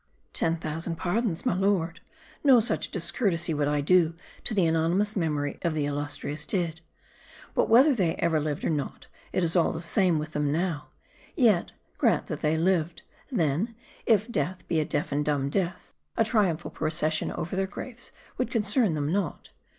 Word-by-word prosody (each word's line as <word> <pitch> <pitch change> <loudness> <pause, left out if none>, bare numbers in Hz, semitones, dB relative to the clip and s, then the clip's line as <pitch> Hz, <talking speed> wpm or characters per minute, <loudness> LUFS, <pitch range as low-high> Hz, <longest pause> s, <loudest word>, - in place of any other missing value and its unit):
" - - -42
Ten 165 0 +2
thousand 165 +1 -3
pardons, 180 +1 -1
my - - +2
lord, 185 -3 +1 0.4
no 265 -4 +7
such 220 0 0
discourtesy 175 -1 0
would 145 -1 0
I 145 0 +1
do 165 +1 +3 0.3
the 200 -6 +2
anonymous 170 +6 +2
memory 150 -6 -1
of 170 -3 0
.the 150 -2 0
illustrious 145 +1 -4
dead. 170 -5 -1 0.7
But - - +1
whether 260 +6 +7
they 180 -9 +1
ever 165 -2 +1
lived 150 -1 -2
or - - +1
not, 145 -3 -3 0.3
it 185 - 0
is 165 +1 +1
all 170 - +4
the 160 - -4
same 180 -1 +2
with 155 +1 -4
them 150 -1 0
now. 160 -2 -1 0.5
Yet, 220 -9 +3 0.3
grant - - +3
that - - -5
they 155 +1 +2
lived; 170 -1 +1 0.3
then, 185 - 0 0.3
if 220 -1 +4
death 180 -5 -2
be 165 - +1
a 155 - +1
deaf 150 +2 -2
and 145 +1 +1
dumb 140 -2 0
death, 180 +1 -2 0.2
a 225 - +4
triumphal 190 -7 +1
procession 155 0 -1
over 175 - -4
their 190 0 0
graves 240 +4 -8 0.3
would" 255 - 0
concern 210 - +1
them 145 0 -1
not. 190 -4 -2
170 Hz, 175 wpm, -27 LUFS, 155-195 Hz, 0.7 s, no